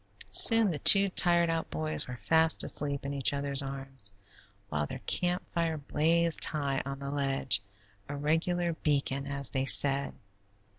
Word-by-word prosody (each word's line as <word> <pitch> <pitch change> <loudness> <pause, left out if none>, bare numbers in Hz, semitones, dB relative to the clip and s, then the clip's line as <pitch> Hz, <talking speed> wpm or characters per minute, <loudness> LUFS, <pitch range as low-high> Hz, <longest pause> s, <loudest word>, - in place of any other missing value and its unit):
Soon 225 -4 +4
the 150 - -5
two 200 +4 +7
tired 170 -2 +2
out 165 0 -4
boys 155 0 -4
were 125 -1 -8
fast 160 +9 +2
asleep 140 -2 -1
in 140 - -4
each 140 0 +1
other's 140 0 -3
arms, 135 -5 -3 0.6
while 75 0 -3
their - - -7
camp 180 0 -1
fire 165 -2 -2
blazed 165 +3 +1
high 140 -3 -3
on 135 0 -6
the 140 0 -7
ledge, 135 -6 0 0.5
a 140 - -5
regular 165 +4 -1
beacon, 140 -3 -2
as 140 -1 -2
they 135 -1 -1
said. 140 0 +3
145 Hz, 155 wpm, -29 LUFS, 135-165 Hz, 0.6 s, two